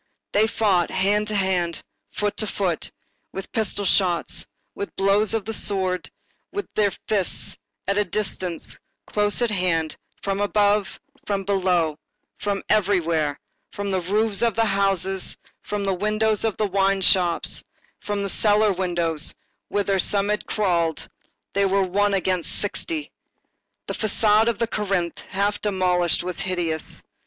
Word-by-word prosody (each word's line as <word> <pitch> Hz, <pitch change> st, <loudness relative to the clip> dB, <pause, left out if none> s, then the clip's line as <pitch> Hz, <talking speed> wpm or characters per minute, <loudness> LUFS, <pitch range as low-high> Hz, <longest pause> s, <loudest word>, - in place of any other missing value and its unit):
They 215 Hz, +2 st, +4 dB
fought 195 Hz, -6 st, +2 dB
hand 205 Hz, +3 st, +1 dB
to 215 Hz, -, -1 dB
hand, 185 Hz, -4 st, 0 dB, 0.3 s
foot 205 Hz, 0 st, -1 dB
to 215 Hz, -, +1 dB
foot, 185 Hz, -5 st, -1 dB, 0.4 s
with 195 Hz, -, -6 dB
pistol 210 Hz, -3 st, 0 dB
shots, 180 Hz, -3 st, +1 dB, 0.3 s
with 405 Hz, -1 st, -6 dB
blows 200 Hz, +3 st, +3 dB
of 215 Hz, -3 st, -2 dB
the 225 Hz, -, -3 dB
sword, 185 Hz, -4 st, 0 dB, 0.4 s
with 405 Hz, -, -3 dB
their 210 Hz, -1 st, +3 dB, 0.2 s
fists, 200 Hz, -4 st, +1 dB, 0.3 s
at 200 Hz, +1 st, +2 dB
a -, -, +4 dB
distance, 185 Hz, -3 st, -2 dB, 0.3 s
close 210 Hz, +3 st, +1 dB
at 235 Hz, -, +1 dB
hand, 170 Hz, -5 st, 0 dB, 0.3 s
from 195 Hz, 0 st, -1 dB
above, 205 Hz, 0 st, +2 dB, 0.3 s
from 200 Hz, -1 st, 0 dB
below, 180 Hz, -5 st, +1 dB, 0.4 s
from 200 Hz, -1 st, -1 dB
everywhere, 170 Hz, -8 st, +2 dB, 0.3 s
from 200 Hz, -1 st, -3 dB
the 190 Hz, -1 st, +1 dB
roofs 205 Hz, +3 st, +1 dB
of 235 Hz, -3 st, +2 dB
the 225 Hz, -, +3 dB
houses, 195 Hz, -2 st, 0 dB, 0.2 s
from 205 Hz, -1 st, -3 dB
the 195 Hz, -1 st, +1 dB
windows 215 Hz, +2 st, +1 dB
of 225 Hz, -3 st, 0 dB
the 215 Hz, -, +1 dB
wine 195 Hz, 0 st, +2 dB
shop, 180 Hz, -2 st, +3 dB, 0.5 s
from 205 Hz, -1 st, -2 dB
the -, -, -1 dB
cellar 210 Hz, +1 st, +3 dB
windows, 170 Hz, -4 st, -1 dB, 0.3 s
whither 200 Hz, -1 st, +1 dB
some 200 Hz, +2 st, +2 dB
had 210 Hz, 0 st, -1 dB
crawled. 170 Hz, -6 st, 0 dB, 0.5 s
They 200 Hz, 0 st, +3 dB
were 195 Hz, 0 st, +2 dB
one 200 Hz, +2 st, +2 dB
against 185 Hz, -2 st, 0 dB
sixty. 305 Hz, -, -3 dB, 0.7 s
The -, -, -4 dB
façade 215 Hz, 0 st, +3 dB
of 235 Hz, -3 st, +1 dB
Corinthe, 195 Hz, -5 st, -1 dB
half 205 Hz, +2 st, 0 dB
demolished, 180 Hz, -4 st, +2 dB
was 180 Hz, 0 st, -4 dB
hideous. 175 Hz, -4 st, -1 dB
195 Hz, 145 wpm, -24 LUFS, 180-210 Hz, 0.7 s, They